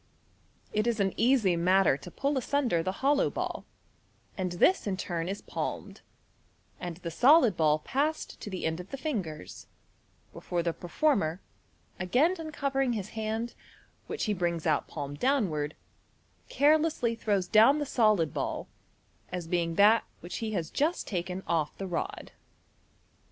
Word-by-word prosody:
It 215 +2 +1
is 235 -2 0
an 195 -1 +1
easy 230 -6 +3
matter 185 -1 +4
to 160 - -10
pull 280 - -1
asunder 260 -8 +1
the 185 - -1
hollow 285 0 +4
ball, - - -4 0.7
and 185 -2 -2
this 285 - +3
in 190 -2 -1
turn 170 -2 -3
is 200 +1 -5
palmed, - - -5 0.8
and 175 -2 -5
the 170 - -2
solid 250 - +5
ball 155 -2 +3
passed 290 - -2
to - - -6
the 185 -2 -4
end 160 +1 -1
of 180 +2 -9
the 275 - -5
fingers, 195 - -5 0.7
before 175 -1 -3
the 170 -1 0
performer, 175 - 0 0.6
again 255 - +2
uncovering 275 -5 -1
his 210 -2 -4
hand, 220 +1 -3 0.5
which 440 - -3
he 210 - +1
brings 170 -3 -1
out 155 -3 +1
palm 145 -2 -5
downward, 160 - 0 0.7
carelessly 300 -4 +3
throws 205 -5 0
down 225 +8 +6
the 295 - -1
solid 215 - +2
ball, - - -3 0.6
as 180 -1 -4
being 170 -1 -1
that 210 +4 +6 0.2
which 175 - -6
he 220 -2 -3
has 170 -5 -2
just 320 +5 0
taken 180 0 -3
off 160 -3 -1
the 195 - -4
rod. 175 -3 -4
200 Hz, 150 wpm, -29 LUFS, 170-265 Hz, 0.8 s, down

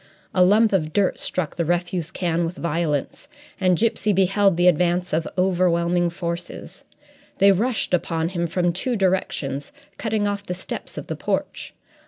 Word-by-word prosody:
A 185 - +5
lump 210 +3 +4
of 155 -5 0
dirt 200 -2 +1
struck 180 -5 -2
the 170 - +1
refuse 175 0 -1
can 170 -2 -1
with 170 +2 -4
violence, 165 - -2 0.3
and 185 -2 +3
Gipsy 220 -1 +1
beheld 195 0 +3
the 175 +1 +4
advance 180 +1 +2
of 160 +1 0
overwhelming 175 -1 +2
forces. 170 0 -6 0.5
They 200 +1 +6
rushed 220 +2 0
upon 165 -2 0
him 170 -2 -2
from 175 +1 0
two 240 +8 -1
directions, 185 - -1 0.3
cutting 220 -2 0
off 205 0 -3
the 180 -3 -4
steps 185 - -7
of - - -5
the - - -4
porch. - - -3
180 Hz, 160 wpm, -23 LUFS, 170-195 Hz, 0.5 s, They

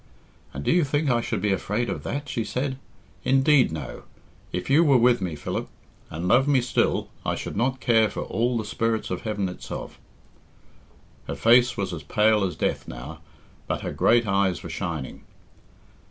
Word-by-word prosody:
"And 70 - -6
do - - +2
you 175 -1 +4
think 145 0 0
I 120 -1 +2
should - - -3
be 105 - +2
afraid 105 +5 -1
of - - -3
that?" 145 +1 -4
she 115 - -2
said. 130 +3 -3 0.4
"Indeed, 135 - +4
no. 75 -6 -6 0.5
If 90 - -3
you 145 +5 +5
were 140 -5 +5
with 120 -1 +4
me, 90 -4 -3
Philip, 75 - -4 0.4
and 85 +3 -4
loved 125 +8 +4
me 140 -2 +4
still, 125 0 0
I - - -1
should - - -6
not 130 +5 0
care 115 -4 +3
for - - -5
all 120 +1 0
the 110 - -3
spirits 110 +1 -1
of - - -3
heaven 105 -3 -2
itself." 90 - -7 1.3
Her 70 - -3
face 120 - +4
was - - -2
as - - -5
pale 105 -1 +2
as 90 -4 -2
death - - -2
now, 70 +7 -8 0.5
but - - -2
her - - -4
great 120 0 +3
eyes 95 -2 +1
were 85 - -6
shining. 80 -7 -4
115 Hz, 185 wpm, -25 LUFS, 90-130 Hz, 1.3 s, you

